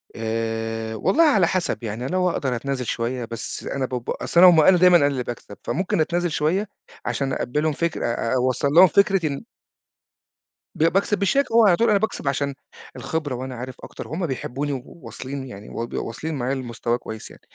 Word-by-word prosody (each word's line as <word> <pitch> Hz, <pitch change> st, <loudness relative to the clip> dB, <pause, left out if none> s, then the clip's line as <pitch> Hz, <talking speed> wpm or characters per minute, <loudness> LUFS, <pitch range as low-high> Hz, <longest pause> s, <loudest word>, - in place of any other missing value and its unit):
آآ، 115 Hz, 0 st, -3 dB
والله 315 Hz, -, +3 dB
على 210 Hz, -, +4 dB
حسب، 180 Hz, -8 st, -1 dB
يعني 115 Hz, +3 st, -4 dB
لو 180 Hz, +3 st, +1 dB
أقدر 130 Hz, -7 st, -1 dB
أتنازل 130 Hz, +1 st, -3 dB
شوية 120 Hz, +1 st, -2 dB
بس 115 Hz, -1 st, -6 dB
أنا 135 Hz, -1 st, -2 dB
ب 125 Hz, -2 st, -5 dB
أصل 170 Hz, -, 0 dB
أنا 180 Hz, +1 st, +10 dB
هُم 175 Hz, -, +5 dB
قالوا 155 Hz, -, +6 dB
أنا 185 Hz, -, +6 dB
دايمًا 180 Hz, 0 st, +7 dB
أنا 140 Hz, -, +3 dB
اللي 135 Hz, -3 st, -1 dB
باكسب، 115 Hz, -4 st, -8 dB
فممكن 180 Hz, -1 st, 0 dB
أتنازل 175 Hz, +2 st, 0 dB
شوية 165 Hz, +8 st, 0 dB, 0.4 s
عشان 135 Hz, -1 st, -1 dB
أقبلهم 150 Hz, +6 st, -1 dB
فكر 170 Hz, +2 st, -2 dB
أ 115 Hz, 0 st, -1 dB
أوصل 130 Hz, +2 st, +1 dB
لهم 175 Hz, +6 st, +7 dB
فكرة 195 Hz, -1 st, +3 dB
إن 140 Hz, -2 st, -4 dB, 1.3 s
ب -, -, 0 dB
باكسب 195 Hz, +5 st, +2 dB
بالشياكة، 225 Hz, +7 st, +1 dB
هو 230 Hz, -1 st, +6 dB
على 185 Hz, -4 st, +6 dB
طول 230 Hz, +6 st, +2 dB
أنا 210 Hz, -, +5 dB
باكسب 220 Hz, -8 st, -3 dB
عشان 140 Hz, +1 st, 0 dB, 0.4 s
الخبرة 150 Hz, -5 st, -3 dB
وأنا 130 Hz, +1 st, -6 dB
عارف 125 Hz, +1 st, -7 dB
أكتر، -, -, -8 dB
هُم 170 Hz, +2 st, -3 dB
بيحبوني 135 Hz, +2 st, -3 dB
وواصلين 130 Hz, 0 st, -8 dB
يعني 105 Hz, -4 st, -10 dB
وواصلين 120 Hz, +6 st, -4 dB
معايا 130 Hz, +1 st, -1 dB
لمستوى 120 Hz, -2 st, -2 dB
كويس 110 Hz, -2 st, -8 dB
يعني. -, -, -16 dB
140 Hz, 185 wpm, -23 LUFS, 120-175 Hz, 1.3 s, أنا